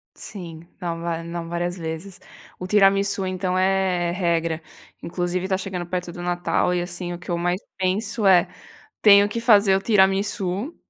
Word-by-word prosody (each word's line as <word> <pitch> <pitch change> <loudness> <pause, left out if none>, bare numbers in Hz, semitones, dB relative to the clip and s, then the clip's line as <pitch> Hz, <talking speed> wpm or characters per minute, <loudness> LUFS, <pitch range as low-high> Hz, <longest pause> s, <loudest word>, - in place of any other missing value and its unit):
Sim, 170 -5 -9 0.2
não 170 -2 -4
va 170 -1 -3
não 170 0 -6
várias 175 +1 -2
vezes. 170 +3 -7 0.4
O 180 - -5
tiramisu 195 -1 +3
então 185 0 -2
é 185 -2 +1
regra, 170 -3 -1 0.4
inclusive 175 +1 -2
está 190 0 0
chegando 185 -2 -5
perto 180 -1 -4
do 175 - -9
Natal 175 0 0
e 175 - 0
assim 175 0 -5
o 175 - -6
que 175 - -7
eu 170 - 0
mais 175 +2 -1 0.2
penso 205 +4 -1
é, 180 -3 +5 0.6
tenho 205 -1 +7
que 230 - -3
fazer 210 -4 +5
o 195 - +2
tiramisu, 195 - +1
180 Hz, 165 wpm, -23 LUFS, 175-195 Hz, 0.6 s, tenho